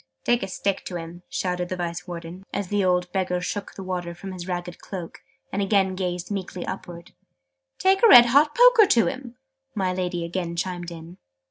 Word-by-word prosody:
"Take 240 Hz, 0 st, +2 dB
a 195 Hz, -, -3 dB
stick 195 Hz, +1 st, -2 dB
to 180 Hz, -, -6 dB
him!" 170 Hz, +1 st, -7 dB
shouted 180 Hz, -1 st, -2 dB
the 185 Hz, -, -2 dB
Vice 175 Hz, 0 st, -4 dB
Warden, 175 Hz, +1 st, -8 dB
as 200 Hz, -3 st, -3 dB
the 205 Hz, -1 st, +1 dB
old 180 Hz, -1 st, +1 dB
Beggar 180 Hz, -1 st, 0 dB
shook 200 Hz, +3 st, -5 dB
the 195 Hz, -, -7 dB
water 180 Hz, -2 st, -4 dB
from 190 Hz, +2 st, -8 dB
his 180 Hz, -1 st, -7 dB
ragged 175 Hz, -1 st, -4 dB
cloak, 180 Hz, -4 st, -8 dB, 0.3 s
and 200 Hz, -, 0 dB
again 195 Hz, -1 st, +2 dB
gazed 180 Hz, 0 st, -3 dB
meekly 185 Hz, -2 st, -4 dB
upwards. 170 Hz, -1 st, -7 dB, 0.7 s
"Take 385 Hz, +1 st, +3 dB
a 465 Hz, -, +8 dB
red 245 Hz, -, +10 dB
hot 285 Hz, +5 st, +4 dB
poker -, -, +7 dB
to 230 Hz, -8 st, +4 dB
him!" 250 Hz, -2 st, -5 dB, 0.4 s
my 190 Hz, -3 st, 0 dB
Lady 180 Hz, -2 st, -2 dB
again 170 Hz, 0 st, -3 dB
chimed 175 Hz, 0 st, -3 dB
in. 170 Hz, +1 st, -10 dB
185 Hz, 195 wpm, -24 LUFS, 175-200 Hz, 0.7 s, red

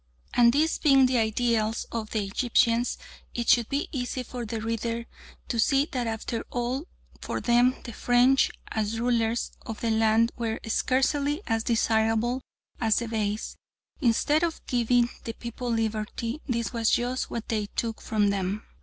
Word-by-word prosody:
And 235 Hz, -1 st, +6 dB
these 310 Hz, +5 st, +1 dB
being 270 Hz, -3 st, +5 dB
the 250 Hz, -1 st, +2 dB
ideals 225 Hz, 0 st, +1 dB
of 220 Hz, -2 st, -3 dB
the 215 Hz, -3 st, -1 dB
Egyptians, 235 Hz, +3 st, +1 dB, 0.4 s
it 235 Hz, -1 st, -1 dB
should 235 Hz, -2 st, +4 dB
be 280 Hz, +3 st, -1 dB
easy 255 Hz, -2 st, -3 dB
for 245 Hz, -1 st, -6 dB
the 225 Hz, +1 st, -3 dB
reader 230 Hz, +1 st, -2 dB, 0.4 s
to 235 Hz, -, -2 dB
see 275 Hz, +4 st, +3 dB
that 250 Hz, -3 st, -2 dB
after 225 Hz, +1 st, -3 dB
all 250 Hz, +6 st, -2 dB, 0.3 s
for -, -, -3 dB
them 245 Hz, +1 st, +3 dB
the 235 Hz, -, -7 dB
French, 245 Hz, +4 st, +4 dB, 0.2 s
as 220 Hz, +1 st, -1 dB
rulers 235 Hz, -1 st, 0 dB
of 225 Hz, -, -7 dB
the 230 Hz, -, +1 dB
land, 220 Hz, +1 st, +3 dB
were 225 Hz, -2 st, -2 dB
scarcely 280 Hz, -, +1 dB
as 225 Hz, 0 st, 0 dB
desirable 225 Hz, +2 st, +1 dB, 0.4 s
as 220 Hz, -2 st, +2 dB
the 235 Hz, -, -1 dB
Beys. 215 Hz, -1 st, -2 dB, 0.4 s
Instead 290 Hz, +4 st, +2 dB
of 335 Hz, -2 st, -2 dB
giving 240 Hz, 0 st, +2 dB, 0.2 s
the 230 Hz, -, -4 dB
people 240 Hz, +1 st, -6 dB
liberty, 225 Hz, +4 st, -2 dB
this 235 Hz, -2 st, -1 dB
was 230 Hz, -1 st, +1 dB
just 245 Hz, +2 st, 0 dB
what 230 Hz, -, -5 dB
they 215 Hz, -3 st, -1 dB
took 225 Hz, -1 st, -2 dB
from 205 Hz, -2 st, +1 dB
them. 200 Hz, +2 st, -2 dB
235 Hz, 160 wpm, -27 LUFS, 225-250 Hz, 0.4 s, And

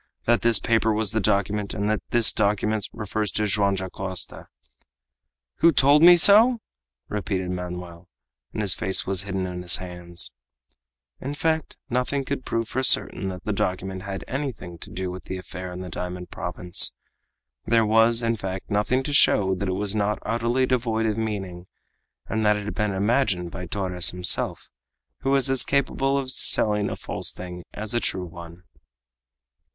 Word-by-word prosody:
that 120 Hz, 0 st, +3 dB
this 115 Hz, -1 st, +4 dB
paper 115 Hz, -1 st, +1 dB
was 105 Hz, -2 st, 0 dB
the 110 Hz, -, 0 dB
document, 100 Hz, 0 st, 0 dB
and 100 Hz, -1 st, -1 dB
that 110 Hz, 0 st, 0 dB
this 120 Hz, -2 st, +4 dB
document 105 Hz, 0 st, 0 dB
refers 105 Hz, -1 st, -3 dB
to 105 Hz, +4 st, 0 dB
Joam 100 Hz, -1 st, +2 dB
Dacosta?" 95 Hz, 0 st, -5 dB, 1.1 s
"Who 170 Hz, -, +5 dB
told 145 Hz, +1 st, +5 dB
me 175 Hz, +1 st, +9 dB
so?" 220 Hz, +8 st, +7 dB, 0.5 s
repeated 95 Hz, -3 st, -3 dB
Manoel, 90 Hz, -1 st, -7 dB, 0.4 s
and 110 Hz, -, -3 dB
his 95 Hz, -4 st, +2 dB
face 95 Hz, +1 st, +2 dB
was 95 Hz, -1 st, +1 dB
hidden 95 Hz, -2 st, -3 dB
in 90 Hz, -1 st, -5 dB
his 90 Hz, -1 st, +1 dB
hands. 90 Hz, -5 st, -1 dB, 0.9 s
In 140 Hz, +2 st, -5 dB
fact, 160 Hz, +1 st, -1 dB
nothing 125 Hz, +2 st, -1 dB
could 140 Hz, -2 st, -4 dB
prove 115 Hz, -1 st, -2 dB
for 130 Hz, -, -2 dB
certain 110 Hz, -6 st, +2 dB
that 90 Hz, -1 st, -7 dB
the 105 Hz, -, -2 dB
document 95 Hz, 0 st, -2 dB
had 100 Hz, 0 st, -6 dB
anything 130 Hz, -, -5 dB
to -, -, -10 dB
do 95 Hz, 0 st, -4 dB
with 90 Hz, +1 st, -9 dB
the 95 Hz, -, -5 dB
affair 90 Hz, 0 st, -8 dB
in 90 Hz, +1 st, -7 dB
the 90 Hz, -, -6 dB
diamond 90 Hz, 0 st, -6 dB
province. 90 Hz, -1 st, +1 dB, 0.7 s
There 115 Hz, -1 st, +3 dB
was, 115 Hz, +2 st, +4 dB
in 115 Hz, 0 st, +1 dB
fact, 95 Hz, 0 st, -6 dB
nothing 105 Hz, +6 st, +1 dB
to 145 Hz, +1 st, -4 dB
show 95 Hz, -8 st, +4 dB
that 95 Hz, +1 st, -3 dB
it -, -, 0 dB
was 100 Hz, +2 st, -1 dB
not 105 Hz, 0 st, 0 dB
utterly 120 Hz, +3 st, +1 dB
devoid 115 Hz, -3 st, 0 dB
of 110 Hz, -1 st, 0 dB
meaning, 95 Hz, -5 st, -4 dB, 0.6 s
and 110 Hz, 0 st, -2 dB
that 105 Hz, 0 st, +3 dB
it 105 Hz, -, -6 dB
had 105 Hz, -, -4 dB
been 105 Hz, -1 st, -1 dB
imagined 95 Hz, -3 st, 0 dB
by 90 Hz, 0 st, -7 dB
Torres 90 Hz, -1 st, +1 dB
himself, 90 Hz, 0 st, -1 dB, 0.5 s
who 135 Hz, -, -2 dB
was 140 Hz, 0 st, +3 dB
as 135 Hz, -, +3 dB
capable 135 Hz, 0 st, 0 dB
of 135 Hz, -2 st, -2 dB
selling 105 Hz, -4 st, +2 dB
a -, -, -4 dB
false -, -, -3 dB
thing 90 Hz, -1 st, -8 dB
as 105 Hz, +1 st, -5 dB
a 120 Hz, -, +2 dB
true 95 Hz, -5 st, -2 dB
one! 85 Hz, +1 st, -11 dB
105 Hz, 175 wpm, -24 LUFS, 90-115 Hz, 1.1 s, me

